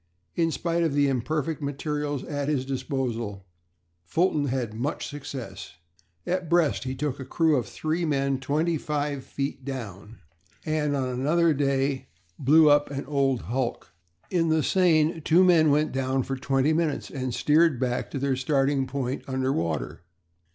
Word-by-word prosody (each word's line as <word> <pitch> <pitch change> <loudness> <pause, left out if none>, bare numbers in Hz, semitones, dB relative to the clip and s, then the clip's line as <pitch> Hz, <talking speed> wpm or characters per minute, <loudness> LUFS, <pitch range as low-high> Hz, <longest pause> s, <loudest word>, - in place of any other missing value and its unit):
In 165 -1 +1
spite 170 +1 -1
of 160 -4 +1
the 145 -1 +4
imperfect 150 +4 -1
materials 145 0 -3
at 145 -2 -3
his 135 -4 0
disposal 125 -7 -3 0.6
Fulton 155 - +1
had 125 -5 -2
much 125 +7 -3
success. 130 - -7 0.5
At 180 -2 -2
Brest 170 -6 +2
he 130 0 -3
took 140 0 -3
a - - -4
crew 160 +3 +2
of 120 -6 -1
three 160 +8 -2
men 140 -3 0
twenty 155 +4 0
five 145 -2 -2
feet 135 -1 -4
down, 115 -5 -7 0.5
and 155 -2 0
on 130 -2 -1
another 155 +6 +2
day 135 -1 0 0.3
blew 155 +4 +6
up 145 0 +4
an 140 -1 -4
old 135 -3 +1
hulk. 125 0 -3 0.4
In 165 -3 +2
the 160 -1 +2
Seine 165 -3 +3
two 165 +4 +4
men 165 -4 +5
went 150 +2 +2
down 130 0 0
for 135 - -3
twenty 135 +3 +1
minutes 155 -3 -1
and 130 -2 -3
steered 150 +1 +3
back 125 -1 -1
to - - -5
their 135 0 0
starting 135 0 +1
point 130 0 -3
under 130 0 0
water. 80 -2 -2
140 Hz, 160 wpm, -26 LUFS, 130-155 Hz, 0.6 s, blew